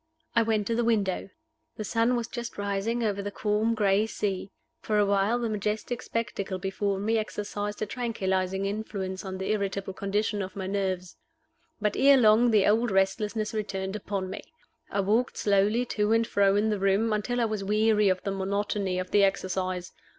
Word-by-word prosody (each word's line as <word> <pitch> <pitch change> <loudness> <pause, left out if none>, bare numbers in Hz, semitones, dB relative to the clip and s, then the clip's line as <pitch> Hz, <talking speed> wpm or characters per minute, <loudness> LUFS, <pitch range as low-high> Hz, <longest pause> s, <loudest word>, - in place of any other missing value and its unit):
I 230 - +5
went 220 -2 +1
to 230 - -1
the 235 +1 +1
window. 205 -5 0 0.5
The 215 - -3
sun 230 +3 +1
was 235 -1 -2
just 240 -1 -6
rising 205 +4 -1
over 205 -2 0
the 200 - -3
calm 210 +2 0
gray 205 0 +2
sea. 195 -3 -3 0.3
For 215 - -1
a 205 - +4
while 200 +3 +2
the 240 -1 -1
majestic 215 +3 -2
spectacle 205 -5 -3
before 195 +1 -1
me 220 +3 +1
exercised 210 -1 -4
a - - 0
tranquilizing 195 -5 -1
influence 200 -2 -4
on 190 -1 -5
the 190 +2 -2
irritable 195 -2 -2
condition 205 +2 -1
of 190 0 -6
my 195 -1 -4
nerves. 190 -2 -2 0.6
But 210 -1 0
ere 275 0 +6
long 230 0 +5
the 215 -4 +4
old 230 +3 +3
restlessness 210 +3 0
returned 195 -2 -3
upon 200 -2 -3
me. 190 - -6 0.5
I 200 - 0
walked 220 +6 +1
slowly 205 +4 +2
to 210 +1 +2
and 230 0 +3
fro 200 -3 +3
in 215 +1 +2
the 210 - -1
room, 195 +3 +2
until 230 +4 -1
I 235 - +3
was 215 -2 -2
weary 210 0 +3
of 185 -1 0
the 200 - -2
monotony 195 0 -1
of 185 0 -4
the 205 - +5
exercise. 185 -2 -1
205 Hz, 185 wpm, -27 LUFS, 195-220 Hz, 0.6 s, ere